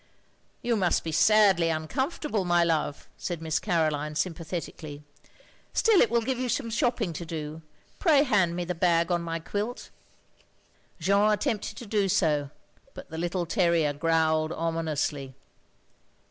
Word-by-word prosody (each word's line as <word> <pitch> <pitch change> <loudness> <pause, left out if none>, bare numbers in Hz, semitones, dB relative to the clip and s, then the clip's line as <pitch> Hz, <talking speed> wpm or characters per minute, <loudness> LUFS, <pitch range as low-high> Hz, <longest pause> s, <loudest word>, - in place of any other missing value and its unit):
"You 240 -1 +1
must 185 -5 +1
be 160 - -3
sadly 190 0 +4
uncomfortable, 210 - -2
my 175 -1 +3
love,'' 160 -4 -1
said 175 -3 -4
Miss 160 -1 -1
Caroline, 155 -5 0
sympathetically. 160 -3 -4 0.7
"Still 445 -5 +4
it - - +4
will 235 -1 +1
give 260 +1 -2
you 255 -1 -2
some 230 -2 -1
shopping 235 - 0
to 165 - -5
do. 160 -1 -6 0.4
Pray 300 -6 +5
hand 190 - +2
me 175 0 -2
the 180 - -2
bag 170 0 +2
on 175 -1 +1
my 165 -1 -3
quilt." 205 +8 -5 1.1
Jeanne 200 +5 +3
attempted 210 +1 -2
to 245 - -8
do 205 -2 0
so, 150 -6 +1 0.5
but - - -11
the 160 - -6
little 175 +1 -1
terrier 170 -5 +2
growled 160 +1 +1
ominously. 155 -5 -2
170 Hz, 145 wpm, -27 LUFS, 160-210 Hz, 1.1 s, Pray